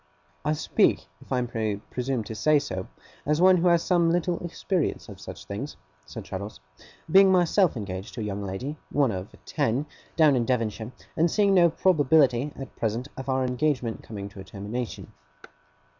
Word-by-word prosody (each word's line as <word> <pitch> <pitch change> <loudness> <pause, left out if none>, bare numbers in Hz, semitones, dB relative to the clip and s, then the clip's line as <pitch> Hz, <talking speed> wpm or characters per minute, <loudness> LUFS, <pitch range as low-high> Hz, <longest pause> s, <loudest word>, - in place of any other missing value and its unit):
'I 150 - +1
speak, 150 - +2 0.2
if - - -17
I 130 - +2
may 110 -3 -2
presume 125 +4 -3
to 110 - -7
say 150 +7 +3
so, 95 -9 -3 0.4
as 150 +2 +1
one 185 +1 +6
who 175 +1 +2
has 170 -1 +4
some 175 -3 +3
little 175 0 0
experience 175 0 -2
of 100 -3 -11
such 95 - -9
things,' 115 +9 -6 0.3
said - - -7
Traddles, 100 +3 -6 0.5
'being 195 +1 +7
myself 180 -3 +3
engaged 95 -2 -6
to 120 - -4
a - - -2
young 100 -1 -3
lady 115 +11 -4
one 140 -4 +2
of 95 0 -6
ten, 125 +6 0 0.3
down 155 -4 +5
in 120 - +2
Devonshire 115 -2 -1 0.2
and 165 +2 +3
seeing 200 +2 +3
no 175 -2 +6
probability, 145 -6 +3
at 135 - -9
present, 115 +4 -2
of 130 0 -6
our 130 0 +1
engagement 125 -2 -1
coming 100 -3 -7
to 100 - -13
a - - -7
termination. 105 +5 -6
130 Hz, 175 wpm, -26 LUFS, 110-160 Hz, 0.5 s, being